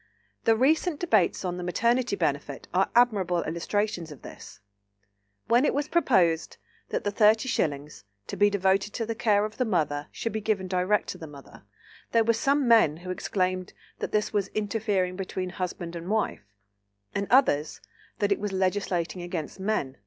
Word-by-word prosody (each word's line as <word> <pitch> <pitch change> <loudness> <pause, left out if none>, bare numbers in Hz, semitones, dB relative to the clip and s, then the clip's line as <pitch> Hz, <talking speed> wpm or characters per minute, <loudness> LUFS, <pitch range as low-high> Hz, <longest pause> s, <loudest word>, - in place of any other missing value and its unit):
The 225 - +5
recent 305 +6 +2
debates 215 - +2
on 180 -1 -2
the 180 - -5
Maternity 235 +6 +1
Benefit 145 -5 -2
are 190 +2 +2
admirable 200 -8 +3
illustrations 175 +1 -2
of 145 - -12
this. 100 - -11 0.9
When 240 +3 +4
it 295 - +1
was 290 +1 -1
proposed 185 - +2 0.3
that - - -2
the 205 - -1
thirty 215 +4 +4
shillings, 145 - -2 0.2
to - - -6
be 205 +2 +4
devoted 195 +1 +1
to 230 - -2
the 230 - -2
care 210 -2 +2
of 215 0 -8
the 255 - +2
mother, 150 -9 -1
should 230 - -4
be 220 - -3
given 205 -3 -1
direct 185 +3 +1
to - - -6
the 160 - -8
mother, 140 -7 -14 0.5
there 230 -1 +5
were 230 +1 +3
some 275 +4 +1
men 220 -10 +5
who 185 - -3
exclaimed 185 0 -2 0.3
that - - -4
this 210 0 0
was 200 -2 +1
"interfering 205 -3 -1
between 185 -1 -4
husband 175 -1 -5
and 170 +2 -6
wife," 210 - -1 0.7
and 200 0 -2
others, 155 - +3 0.4
that 205 -2 0
it 200 - +2
was 205 0 -3
"legislating 185 -2 -1
against 175 -1 -5
men." 190 -10 -2
195 Hz, 175 wpm, -27 LUFS, 175-220 Hz, 0.9 s, The